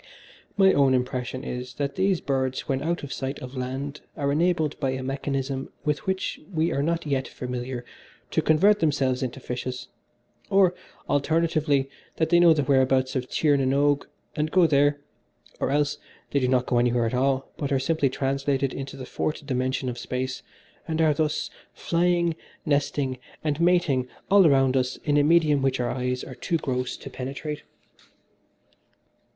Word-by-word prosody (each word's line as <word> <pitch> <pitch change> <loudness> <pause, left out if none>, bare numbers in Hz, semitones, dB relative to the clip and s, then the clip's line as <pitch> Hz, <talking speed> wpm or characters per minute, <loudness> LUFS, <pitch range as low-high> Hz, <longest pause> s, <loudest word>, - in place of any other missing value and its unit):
My 190 -1 +6
own 135 -2 +4
impression 125 0 -2
is, 125 -1 -5
that 140 0 -2
these 190 -1 +1
birds 130 -2 -1
when 135 -1 0
out 170 +1 -1
of 140 - -5
sight 135 +1 -4
of 130 -1 -9
land 135 +3 -4 0.2
are 140 -2 0
enabled 160 -1 +1
by 135 - 0
a 130 0 -3
mechanism 135 0 -3 0.2
with 150 +1 -1
which 190 0 -1
we 165 -1 +1
are 140 - 0
not 165 +2 -1
yet 135 -3 -1
familiar, 125 0 -5 0.5
to - - +2
convert 200 +7 +4
themselves 135 -5 +1
into 130 0 -3
fishes, 125 0 -5 0.6
or, 195 -2 +4 0.3
alternatively, 150 -2 +1 0.3
that 160 - 0
they 175 0 +5
know 175 -1 +7
the 150 -2 +3
whereabouts 130 -1 +2
of 130 -1 -2
Tir 150 -2 +2
na - - +1
n 130 0 +1
Og 145 0 +2 0.3
and 150 0 0
go 180 +1 +5
there, 145 -1 +3 0.6
or - - 0
else 145 +1 +1
that - - -27 0.2
they 140 - +2
do 130 - +1
not 125 -1 +2
go 120 - +2
anywhere 120 -1 +2
at 115 - -2
all 135 +1 0
but 140 -2 -3
are 135 - +3
simply 140 +1 +1
translated 135 0 -1
into 135 0 -6
the 130 - -7
Fourth 150 +3 -3
Dimension 130 -1 -1
of 120 -1 -4
Space, 130 +1 -3 0.5
and 160 -1 -2
are, 160 -2 +4
thus, 155 +1 -1 0.2
flying, 170 -1 +1 0.3
nesting 140 -3 0 0.2
and 150 0 -1
mating 170 -8 +3 0.2
all 195 -3 +7
around 135 -2 +4
us 130 -1 +1
in 145 -1 +2
a 145 - +5
medium 150 -2 +4
which 135 -1 +1
our 120 - 0
eyes 125 0 -2
are 130 - -8
too 150 +7 -1
gross 125 -4 -2
to - - -9
penetrate. 145 +3 -5
140 Hz, 175 wpm, -25 LUFS, 130-155 Hz, 0.6 s, know